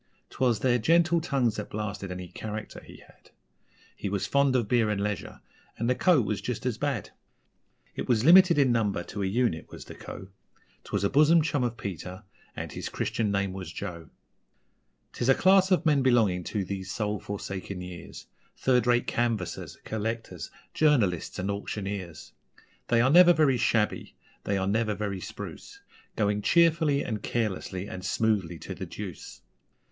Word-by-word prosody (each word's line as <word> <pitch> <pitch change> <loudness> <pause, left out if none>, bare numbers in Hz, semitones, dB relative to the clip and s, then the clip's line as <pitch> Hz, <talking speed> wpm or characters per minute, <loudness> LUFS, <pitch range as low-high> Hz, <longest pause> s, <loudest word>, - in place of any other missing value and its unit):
'Twas 120 -4 +1
their 125 -1 +3
gentle 170 +6 +3
tongues 130 -8 0
that 105 - -5
blasted 100 -2 -4
any 90 0 -6
'character' 105 +4 -7
he - - -14
had - - -23 0.7
He 100 - -4
was 100 -1 -1
fond 140 -1 +2
of 120 -4 +1
beer 115 -1 +2
and 105 -2 -1
leisure 105 -1 -4 0.4
and 115 - -1
the 125 - +3
Co. 175 +3 +4
was 105 -1 -2
just 125 -1 -4
as 120 -3 -1
bad. 140 -9 -2 0.8
It - - -5
was 120 -1 +2
limited 180 0 +7
in 135 -3 +4
number 105 -6 0
to 100 - -6
a 95 - 0
unit, 105 -5 0
was - - -10
the - - -10
Co. 95 - -9 0.6
'Twas - - -2
a 100 - +2
bosom 155 +3 +5
chum 145 -4 0
of 120 -1 -2
Peter 95 -1 -6 0.3
and - - -5
his - - -5
Christian 110 -2 -1
name 100 -1 0
was 95 -1 -7
Joe. 85 -2 -7 1.0
'Tis 120 - -1
a 135 - +7
class 190 0 +5
of 185 -2 +2
men 150 -3 +4
belonging 110 -9 +3
to 100 -3 -2
these 95 0 -5
soul 105 -2 -2
forsaken 100 -1 -6
years: 90 -1 -9 0.3
Third 125 -2 +2
rate 120 0 +3
canvassers, 110 -8 -2
collectors, 115 +1 -4 0.2
journalists 115 - +2
and 95 +2 -2
auctioneers. 100 - -5 0.5
They 115 -1 +3
are 130 +3 +3
never 175 +2 +8
very 150 -6 +3
shabby, 110 -2 0 0.3
they 100 - 0
are 95 - 0
never 105 +2 0
very 100 -3 -3
spruce - - -8 0.4
Going 105 -1 +1
cheerfully 160 -1 +3
and 110 -3 -3
carelessly 100 -4 -2
and 95 -2 -7
smoothly 95 -3 0
to - - -7
the - - -7
deuce. - - -8
110 Hz, 170 wpm, -27 LUFS, 100-130 Hz, 1.0 s, never